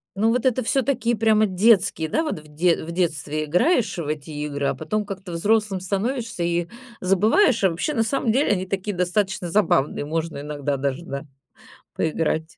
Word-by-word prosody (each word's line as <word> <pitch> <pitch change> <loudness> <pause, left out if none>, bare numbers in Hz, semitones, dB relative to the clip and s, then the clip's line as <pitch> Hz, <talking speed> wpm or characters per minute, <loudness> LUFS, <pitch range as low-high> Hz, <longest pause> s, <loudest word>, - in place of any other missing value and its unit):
Ну, 215 +3 +2
вот 250 +1 0
это, 255 0 +2
всё-таки, 255 -1 +1
прямо 215 0 +3
детские, 190 -5 +3
да, 320 - +1
вот 300 - -3
в 155 - -16
дет 170 +1 +2
в - - -4
детстве 155 -3 -1
играешь 200 - +2
в 160 -4 -4
эти 155 +1 -4
игры, 145 -1 -3
а - - 0
потом 215 -1 -2
как-то 190 -3 -7
взрослым 205 +2 +1
становишься 225 +2 -2
и 170 0 0 0.3
забываешь. 215 - +3
А 190 - +5
вообще, 180 - -2
на 225 - +2
самом 230 -1 0
деле, 270 +2 +2
они 185 -1 -2
такие, 195 +1 -3
достаточно, 180 0 -1
забавные, 150 -7 +1
можно 160 -1 -3
иногда, 145 -1 -3
даже 140 +5 -2
да, 140 +2 -5 0.7
поиграть. 160 0 -1
185 Hz, 175 wpm, -23 LUFS, 160-220 Hz, 0.7 s, А